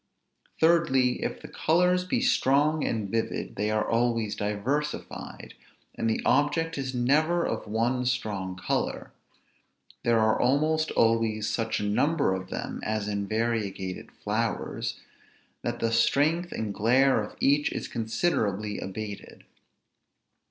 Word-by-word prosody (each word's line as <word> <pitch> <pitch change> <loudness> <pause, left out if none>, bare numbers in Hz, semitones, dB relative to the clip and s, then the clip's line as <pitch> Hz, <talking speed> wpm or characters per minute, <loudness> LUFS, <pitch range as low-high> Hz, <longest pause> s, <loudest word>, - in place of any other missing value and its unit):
Thirdly, 150 -7 +3
if - - -4
the - - -7
colors 180 +3 +2
be 235 +6 0
strong 150 - +3
and 110 -3 -1
vivid, 115 0 -2
they 105 +1 -1
are 110 0 0
always 115 -2 +1
diversified, 120 +9 -3 0.4
and 115 - -1
the 110 - -1
object 165 +4 +2
is 130 -2 -3
never 155 +8 +2
of 110 - -3
one 120 +4 0
strong 105 -7 -2
color; 90 - -2 0.9
there 115 -1 +3
are 110 0 +3
almost 155 +5 +2
always 115 -2 +2
such 115 -1 -1
a - - -3
number 140 +3 +2
of 95 0 -5
them - - -5
(as 105 -1 -2
in 100 -1 -2
variegated 110 -4 -2
flowers) - - -3 0.6
that 120 0 -3
the 115 -1 0
strength 155 +9 +2
and 110 -2 -3
glare 130 +4 +3
of 105 - -9
each 145 +2 +3
is - - -4
considerably 110 - -1
abated. 100 +1 -7
115 Hz, 130 wpm, -27 LUFS, 110-145 Hz, 0.9 s, Thirdly